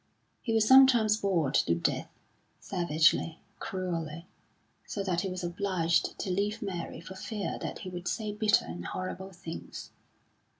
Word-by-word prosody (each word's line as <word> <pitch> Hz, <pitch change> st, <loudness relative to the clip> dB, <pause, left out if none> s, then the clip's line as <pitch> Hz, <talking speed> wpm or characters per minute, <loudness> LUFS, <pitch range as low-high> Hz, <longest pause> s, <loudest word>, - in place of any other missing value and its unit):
He 230 Hz, -, -2 dB
was 220 Hz, -1 st, +3 dB
sometimes 245 Hz, -5 st, +7 dB
bored 175 Hz, -10 st, +1 dB
to 85 Hz, -, +3 dB
death, 85 Hz, -, -1 dB, 0.5 s
savagely, 165 Hz, -2 st, +2 dB, 0.2 s
cruelly; 170 Hz, -3 st, -4 dB, 0.6 s
so 200 Hz, -, -4 dB
that 180 Hz, -3 st, 0 dB
he 195 Hz, -, -2 dB
was 185 Hz, 0 st, -5 dB
obliged 175 Hz, -1 st, 0 dB
to 190 Hz, -, -3 dB
leave 205 Hz, +4 st, 0 dB
Mary 185 Hz, -4 st, -4 dB
for 170 Hz, +3 st, -9 dB
fear 205 Hz, +2 st, -4 dB
that -, -, -4 dB
he -, -, -4 dB
would 175 Hz, -1 st, -6 dB
say 215 Hz, -2 st, -2 dB
bitter 210 Hz, 0 st, +3 dB
and 85 Hz, +1 st, -6 dB
horrible 185 Hz, -, -5 dB
things. 170 Hz, -3 st, -8 dB
185 Hz, 145 wpm, -30 LUFS, 170-205 Hz, 0.6 s, sometimes